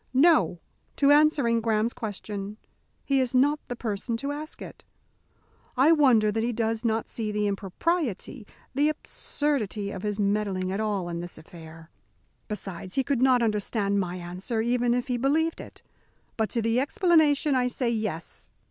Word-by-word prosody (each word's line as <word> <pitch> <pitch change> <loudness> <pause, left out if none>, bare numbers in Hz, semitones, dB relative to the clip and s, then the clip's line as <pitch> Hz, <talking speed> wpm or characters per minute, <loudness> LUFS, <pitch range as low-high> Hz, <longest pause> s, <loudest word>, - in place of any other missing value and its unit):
"No! 305 - +4 0.4
to 280 0 +4
answering 290 -6 +4
Graham's 225 +1 +1
question. 205 -1 -6 0.5
He 275 -1 +2
is 255 -1 0
not 290 +4 +3
the 245 - -4
person 230 0 -3
to 280 +4 -3
ask 305 +2 -6
it. - - -10 0.9
I 275 +5 +6
wonder 250 -9 +5
that 225 +1 -1
he 235 +2 0
does 225 0 -1
not 225 -1 0
see 220 -2 -3
the 210 0 0
impropriety, 215 - -2 0.3
the 290 +3 +3
absurdity 240 -9 -2
of 190 - -6
his 210 0 -3
meddling 200 -2 0
at 195 - -2
all 205 -4 -1
in 170 -1 -4
this 175 +1 -7
affair. 160 0 -13 0.6
Besides, 190 -3 -6
he 270 - +2
could 265 -1 0
not 255 -2 +4
understand 210 -2 0
my 180 -2 -2
answer 185 +6 -4
even 240 +1 +1
if 245 +2 -2
he 250 -2 0
believed 310 +6 +1
it. - - -13 0.5
But 220 -1 0
to 230 -3 -1
the 230 +2 +2
explanation, 300 -1 +3
I 250 -1 +2
say, 245 -1 -1
Yes! 215 -8 -4
230 Hz, 165 wpm, -26 LUFS, 205-270 Hz, 0.9 s, I